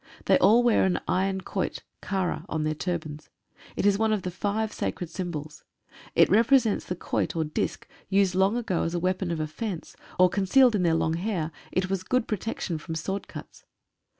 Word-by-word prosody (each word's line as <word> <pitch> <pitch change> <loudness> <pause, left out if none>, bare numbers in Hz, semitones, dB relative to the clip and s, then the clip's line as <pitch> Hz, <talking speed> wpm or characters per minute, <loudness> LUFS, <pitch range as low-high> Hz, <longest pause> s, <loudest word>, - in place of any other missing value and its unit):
They - - +4
all 235 +3 +5
wear 240 -2 +4
an 190 -1 +1
iron 190 +1 0
quoit - - -3 0.2
(kara) 190 -3 -2
on 160 -1 -1
their 155 0 0
turbans. 155 -2 -4 0.5
It - - -1
is 200 0 +4
one 220 0 +2
of 210 -3 0
the 180 - -3
five 210 +4 -2
sacred 175 -2 -4
symbols. 160 -3 -5 0.5
It - - +6
represents 230 0 +3
the 180 - -3
quoit, 175 - -2
or 165 - +1
disc, 155 0 -3 0.2
used 195 -1 +3
long 190 +5 +2
ago 195 -8 -1
as 170 +1 -2
a - - 0
weapon 185 +1 -1
of 165 -2 -2
offence, 160 +4 -5 0.2
or 185 - +7
concealed 205 +7 +4
in 205 - +1
their 170 -2 +3
long 160 0 +1
hair 175 -4 -2 0.2
it 185 +1 0
was 195 -2 0
a - - -15
good 255 +2 +1
protection 205 -5 -3
from 160 +2 -6
sword 190 +5 -3
cuts. - - -11
185 Hz, 195 wpm, -27 LUFS, 165-205 Hz, 0.5 s, or